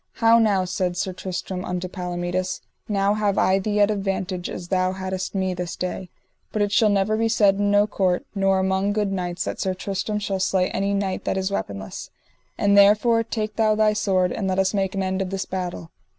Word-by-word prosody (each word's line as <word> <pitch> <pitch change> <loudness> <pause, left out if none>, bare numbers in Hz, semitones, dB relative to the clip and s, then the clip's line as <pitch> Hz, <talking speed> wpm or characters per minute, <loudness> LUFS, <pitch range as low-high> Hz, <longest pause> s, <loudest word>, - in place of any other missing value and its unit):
How 230 0 +5
now, 200 -4 +2
said 180 -1 -2
Sir 185 0 -2
Tristram 185 0 -5
unto 180 0 -3
Palomides, 180 0 -3 0.3
now 200 0 +2
have 210 -2 0
I 190 +1 +3
thee 210 +1 -1
at 205 +1 +4
advantage 195 -3 -2
as 175 -1 -7
thou 185 -1 +1
haddest 190 0 -4
me 190 -1 0
this 175 -1 -4
day; 180 0 -4 0.4
but 215 - +1
it 205 - -1
shall 210 +2 +4
never 205 +1 +2
be 225 +1 +1
said 205 -3 +3
in 205 0 +1
no 205 0 +4
court, 185 -4 0
nor 195 -1 +2
among 190 +1 +1
good 210 -2 0
knights, 180 -2 -2
that - - -4
Sir 190 -1 -1
Tristram 200 +2 -3
shall 200 -2 -2
slay 185 -1 +1
any 200 +1 0
knight 195 -1 -2
that - - 0
is 190 +1 -1
weaponless; 100 - -5 0.5
and 200 0 +3
therefore 210 +3 +5
take 215 -2 -4
thou 215 -1 +3
thy 215 0 +3
sword, 190 -4 +1
and 195 - -2
let 190 0 0
us 190 +1 +2
make 195 -1 -1
an 195 - 0
end 190 +1 -1
of 190 - -2
this 195 0 -3
battle. 180 -3 -5
195 Hz, 210 wpm, -23 LUFS, 185-205 Hz, 0.5 s, How